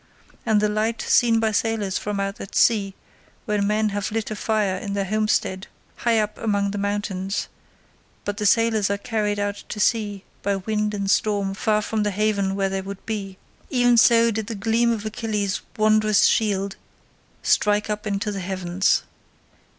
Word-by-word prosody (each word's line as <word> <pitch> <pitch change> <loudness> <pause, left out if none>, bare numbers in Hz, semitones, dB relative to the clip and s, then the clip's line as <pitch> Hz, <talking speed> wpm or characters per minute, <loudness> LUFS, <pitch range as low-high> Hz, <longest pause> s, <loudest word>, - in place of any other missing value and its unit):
As 220 -2 +4
the 210 0 +3
light 215 +2 -1
seen 230 -2 +4
by 220 -1 +1
sailors 215 -3 0
from 205 -1 -3
out 195 0 -3
at 195 - -9
sea, 200 -4 +3 0.5
when 210 -3 0
men 215 +1 +1
have 205 +1 -3
lit 220 0 -2
a - - -2
fire 210 -3 0
in 200 -1 -5
their 200 -1 -1
homestead 210 -2 0 0.3
high 235 -2 +2
up 215 -1 -1
among 200 -2 0
the 205 - -4
mountains, 200 -1 -2 0.8
but 205 0 -3
the 210 - +1
sailors 225 -2 +3
are 200 - 0
carried 210 0 -1
out 205 0 -3
to 210 - -5
sea 205 -3 0 0.2
by 200 0 0
wind 210 +2 -1
and 200 -1 -1
storm 200 -3 +1
far 210 +1 +1
from 220 +1 -1
the 210 - +1
haven 200 -1 0
where 195 -1 0
they 195 0 -2
would 195 0 -8
be—even 225 +4 -1
so 230 0 +5
did 220 -1 -3
the 225 - -4
gleam 225 +3 +2
of 220 -2 -3
Achilles' 215 -3 -2 0.2
wondrous 215 -1 +4
shield 200 -3 +1 0.7
strike 210 0 +2
up 210 0 -3
into 205 +1 -1
the 200 - -4
heavens. 185 0 0
210 Hz, 175 wpm, -23 LUFS, 200-220 Hz, 0.8 s, so